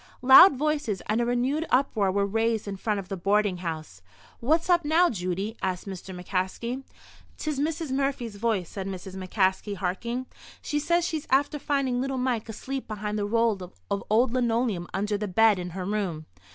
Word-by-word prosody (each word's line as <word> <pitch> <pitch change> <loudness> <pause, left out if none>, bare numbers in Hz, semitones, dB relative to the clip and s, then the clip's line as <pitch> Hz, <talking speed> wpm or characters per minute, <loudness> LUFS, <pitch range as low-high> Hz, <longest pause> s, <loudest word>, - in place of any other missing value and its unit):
Loud 270 +6 +9
voices 290 -8 -1
and 220 +3 +1
a 235 - 0
renewed 255 +6 +1
uproar 225 -7 +2
were 200 +1 +1
raised 225 +1 0
in 200 - -3
front 210 +1 -1
of 190 - -7
the 195 - -4
boarding 200 +1 +1
house. 155 - -6 0.4
"What's 315 +7 +2
up 350 -2 +4
now, 330 +4 +4
Judy?" 190 +2 -3
asked 185 -2 -2
Mr. 190 0 -7
McCaskey. 190 +8 -2 0.6
"'Tis 305 -3 -3
Missis 310 0 -2
Murphy's 265 -5 -1
voice," 210 -5 0
said 195 +2 -6
Mrs. 190 -1 -6
McCaskey, 190 +1 0
harking. 235 +7 -3 0.3
"She 295 - -2
says 340 +3 +1
she's 315 -4 -3
after 285 +2 +2
finding 270 -4 0
little 270 0 -2
Mike 250 -3 -1
asleep 265 +5 -5
behind 210 0 -3
the 205 - -1
roll 225 -2 +1 0.3
of 200 - -1
old 230 +3 +3
linoleum 230 -7 0
under 205 +1 -1
the 210 - -2
bed 215 +1 +4
in 180 0 -4
her 180 +1 -5
room." 185 -6 -2
220 Hz, 180 wpm, -26 LUFS, 195-265 Hz, 0.6 s, Loud